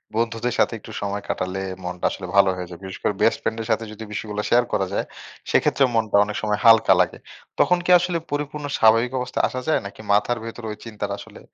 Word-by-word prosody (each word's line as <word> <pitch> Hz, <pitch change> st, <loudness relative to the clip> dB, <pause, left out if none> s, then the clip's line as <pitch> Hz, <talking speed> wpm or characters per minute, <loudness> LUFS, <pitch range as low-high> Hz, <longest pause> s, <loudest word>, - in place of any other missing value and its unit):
বন্ধুদের 115 Hz, +1 st, -1 dB
সাথে -, -, +3 dB
একটু -, -, -12 dB
সময় 100 Hz, 0 st, -3 dB
কাটালে 95 Hz, +1 st, -2 dB, 0.2 s
মনটা 90 Hz, 0 st, -4 dB
আসলে 95 Hz, -, -6 dB
ভালো 100 Hz, -1 st, +6 dB
হয়ে 90 Hz, -1 st, -6 dB
যায়। 85 Hz, -2 st, -10 dB
বিশেষ 95 Hz, -1 st, -7 dB
করে -, -, +1 dB
বেস্ট -, -, +4 dB
ফ্রেন্ডের 110 Hz, 0 st, -3 dB
সাথে 110 Hz, +1 st, +1 dB
যদি 110 Hz, +1 st, -9 dB
বিষয়গুলা 105 Hz, 0 st, -4 dB
শেয়ার 120 Hz, 0 st, +4 dB
করা 95 Hz, -1 st, +1 dB
যায়, -, -, -1 dB, 0.5 s
সেইক্ষেত্রেও 135 Hz, -2 st, +3 dB
মনটা 110 Hz, -2 st, +2 dB
অনেক 105 Hz, 0 st, -5 dB
সময় 105 Hz, -1 st, 0 dB
হালকা 115 Hz, -1 st, +7 dB
লাগে। -, -, -1 dB, 0.4 s
তখন 180 Hz, -, +4 dB
কি 180 Hz, -, +2 dB
আসলে 180 Hz, -1 st, -1 dB
পরিপূর্ণ 145 Hz, 0 st, -3 dB
স্বাভাবিক 115 Hz, +2 st, +4 dB
অবস্থায় 125 Hz, 0 st, 0 dB
আসা 130 Hz, -, -5 dB
যায়? 155 Hz, -, +3 dB
নাকি 100 Hz, +2 st, -9 dB
মাথার 105 Hz, +4 st, +2 dB
ভেতরে 115 Hz, 0 st, -7 dB
ঐ -, -, -4 dB
চিন্তাটা 105 Hz, -3 st, -4 dB
আসলে -, -, -12 dB
110 Hz, 210 wpm, -23 LUFS, 100-120 Hz, 0.5 s, হালকা